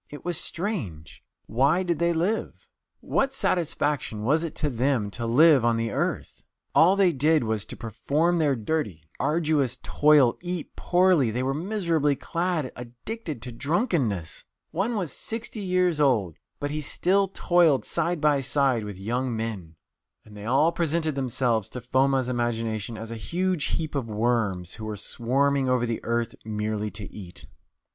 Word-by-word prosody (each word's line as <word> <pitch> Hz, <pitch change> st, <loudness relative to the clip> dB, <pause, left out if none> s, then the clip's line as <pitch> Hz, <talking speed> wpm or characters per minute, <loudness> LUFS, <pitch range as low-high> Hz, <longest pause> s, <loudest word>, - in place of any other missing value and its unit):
It 145 Hz, -, -10 dB
was 175 Hz, -1 st, -1 dB
strange 160 Hz, -, -5 dB, 0.2 s
why 140 Hz, +10 st, +2 dB
did 170 Hz, -4 st, -1 dB
they 170 Hz, 0 st, +2 dB
live? 180 Hz, +7 st, -2 dB, 0.3 s
What 275 Hz, 0 st, 0 dB
satisfaction 150 Hz, -, -1 dB
was 155 Hz, +8 st, +2 dB
it 165 Hz, -, -5 dB
to 150 Hz, -, 0 dB
them 120 Hz, -4 st, 0 dB
to 115 Hz, +2 st, -4 dB
live 145 Hz, +2 st, +6 dB
on 115 Hz, -1 st, +2 dB
the 115 Hz, -1 st, -1 dB
earth? -, -, -3 dB, 0.3 s
All 180 Hz, +4 st, +6 dB
they 195 Hz, -3 st, +4 dB
did 155 Hz, +1 st, +3 dB
was 110 Hz, -2 st, -1 dB
to -, -, -8 dB
perform 150 Hz, +10 st, 0 dB
their 145 Hz, -4 st, +2 dB
dirty, 110 Hz, -, -2 dB, 0.2 s
arduous 150 Hz, -6 st, +1 dB
toil, 145 Hz, -5 st, +4 dB
eat 175 Hz, -2 st, -5 dB
poorly; 175 Hz, -8 st, +3 dB
they 125 Hz, +3 st, -2 dB
were 135 Hz, +1 st, 0 dB
miserably 165 Hz, -4 st, 0 dB
clad, 165 Hz, -3 st, -2 dB
addicted 125 Hz, -, -7 dB
to 125 Hz, -, -4 dB
drunkenness. 135 Hz, -, -1 dB, 0.3 s
One 225 Hz, +4 st, -1 dB
was 180 Hz, -9 st, -2 dB
sixty 225 Hz, 0 st, -4 dB
years 180 Hz, -4 st, +1 dB
old, 110 Hz, -, +2 dB, 0.2 s
but 145 Hz, 0 st, -3 dB
he 155 Hz, +1 st, -2 dB
still 195 Hz, +6 st, +2 dB
toiled 170 Hz, -, +3 dB
side 170 Hz, 0 st, -1 dB
by 145 Hz, -2 st, +3 dB
side 130 Hz, -3 st, +1 dB
with 105 Hz, -2 st, -7 dB
young 120 Hz, +4 st, -2 dB
men. 100 Hz, -8 st, -5 dB, 0.5 s
And 105 Hz, -, -14 dB
they 105 Hz, 0 st, -8 dB
all 140 Hz, +8 st, +3 dB
presented 165 Hz, -2 st, 0 dB
themselves 125 Hz, -5 st, 0 dB
to 125 Hz, -, -7 dB
Foma's 130 Hz, +1 st, +2 dB
imagination 115 Hz, -3 st, -2 dB
as 115 Hz, +1 st, -7 dB
a -, -, -4 dB
huge 175 Hz, -, -1 dB
heap 155 Hz, -2 st, -2 dB
of 135 Hz, -5 st, -2 dB
worms, 105 Hz, -5 st, 0 dB
who 110 Hz, -, -7 dB
were 110 Hz, -1 st, -4 dB
swarming 135 Hz, +6 st, 0 dB
over 125 Hz, -1 st, +2 dB
the 115 Hz, -2 st, -3 dB
earth 115 Hz, 0 st, -1 dB
merely 105 Hz, 0 st, -2 dB
to 105 Hz, +1 st, -6 dB
eat." 90 Hz, -4 st, -10 dB
135 Hz, 160 wpm, -26 LUFS, 115-165 Hz, 0.5 s, live